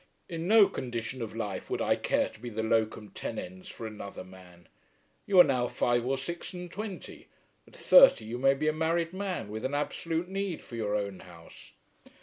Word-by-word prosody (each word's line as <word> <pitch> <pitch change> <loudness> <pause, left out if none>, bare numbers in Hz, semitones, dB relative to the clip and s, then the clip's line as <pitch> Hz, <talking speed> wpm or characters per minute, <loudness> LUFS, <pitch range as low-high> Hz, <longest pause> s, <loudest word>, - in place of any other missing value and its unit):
In 165 -1 -4
no 215 -1 +7
condition 120 -6 -5
of 110 -1 -5
life 105 -4 -4
would - - -2
I - - +2
care - - +1
to - - -17
be 120 - -6
the 110 0 -3
locum 110 -1 0
tenens 95 +1 -7
for 115 - -8
another 105 -3 -7
man. 90 -2 -16 0.6
You 195 -2 +5
are - - +12
now 125 -5 +1
five 120 0 0
or 135 +1 +1
six 170 +7 -6
and 180 -1 -7
twenty. 205 -1 -7 0.4
At - - -18
thirty - - +7
you 120 +3 -5
may 135 +1 +4
be 155 +3 -2
a 155 - +3
married 165 +2 0
man 190 - -3
with 110 +1 -5
an 135 +2 -1
absolute 165 +3 -2
need 195 -2 -3
for 120 - -10
your 105 -2 -1
own 100 -2 -3
house." 85 -2 -15
125 Hz, 195 wpm, -29 LUFS, 110-170 Hz, 0.6 s, are